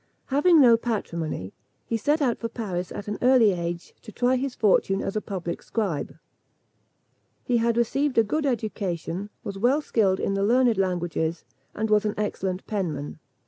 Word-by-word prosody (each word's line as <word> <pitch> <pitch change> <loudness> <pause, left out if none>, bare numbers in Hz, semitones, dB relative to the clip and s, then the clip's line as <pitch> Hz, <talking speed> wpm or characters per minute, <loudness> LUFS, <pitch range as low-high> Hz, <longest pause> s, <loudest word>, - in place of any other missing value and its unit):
Having 320 +4 +5
no 240 -4 +7
patrimony, 170 - -3 0.3
he 230 - -2
set 290 +7 +1
out 245 -4 +1
for 230 - -3
Paris 185 -6 -4
at 205 - -7
an 210 - -4
early 245 -4 +5
age, 170 -1 -4
to 215 - -11
try 245 +3 +1
his 260 0 -2
fortune 195 -2 +2
as 195 - -3
a 215 - 0
public 175 -5 -5
scribe. 190 -10 -3 1.3
He 245 - +1
had 230 0 +1
received 270 +4 +1
a 225 - +7
good 290 +7 -1
education, 205 - -3
was 195 -1 -6
well 250 +7 +3
skilled 200 -10 +1
in 195 - -1
the 195 - 0
learned 235 0 +3
languages, 175 -3 -1 0.3
and 215 0 -2
was 210 0 +4
an 210 -1 -1
excellent 190 -3 -2
penman. 160 -9 -3
210 Hz, 170 wpm, -25 LUFS, 185-240 Hz, 1.3 s, no